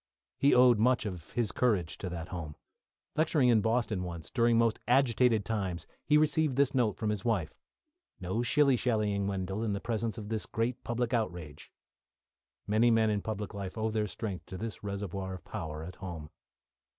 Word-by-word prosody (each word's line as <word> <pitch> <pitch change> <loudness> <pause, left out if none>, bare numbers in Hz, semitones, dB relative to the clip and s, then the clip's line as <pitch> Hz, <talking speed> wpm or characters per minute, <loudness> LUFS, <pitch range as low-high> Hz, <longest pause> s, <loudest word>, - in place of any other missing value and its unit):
He 140 - +5
owed 125 -3 +6
much 125 +1 +3
of 90 -5 -6
his 115 -5 0
courage 100 -10 0
to 95 - -4
that 85 0 -6
home. 80 -5 -6 0.6
Lecturing 150 -4 +3
in 115 -3 +5
Boston 110 -3 0
once, 85 -3 -6
during 115 -2 +3
most 115 -1 +2
agitated 120 -4 +3
times, 95 -6 -2 0.2
he 150 - +4
received 155 -2 +2
this 140 0 +2
note 120 -6 +1
from 110 -1 -1
his 105 -3 -3
wife: 105 -10 -1 0.6
"No 95 +5 -2
shilly 135 +2 +4
shallying, 105 -5 0
Wendell, 95 +2 -2
in 110 -3 0
the 100 - -2
presence 115 0 -2
of 105 -2 -7
this 110 -1 -2
great 115 +2 -2
public 120 +1 -2
outrage." 85 -10 -3 0.9
Many 110 +3 +3
men 110 -1 +3
in 105 -1 0
public 105 0 -4
life 100 0 -6
owe 110 0 0
their 105 -1 0
strength 100 -2 -5
to 95 - -7
this 110 +1 -6
reservoir 100 -2 -4
of 90 - -12
power 75 0 -5
at 85 +2 -9
home. 85 -5 -7
110 Hz, 180 wpm, -31 LUFS, 95-120 Hz, 0.9 s, owed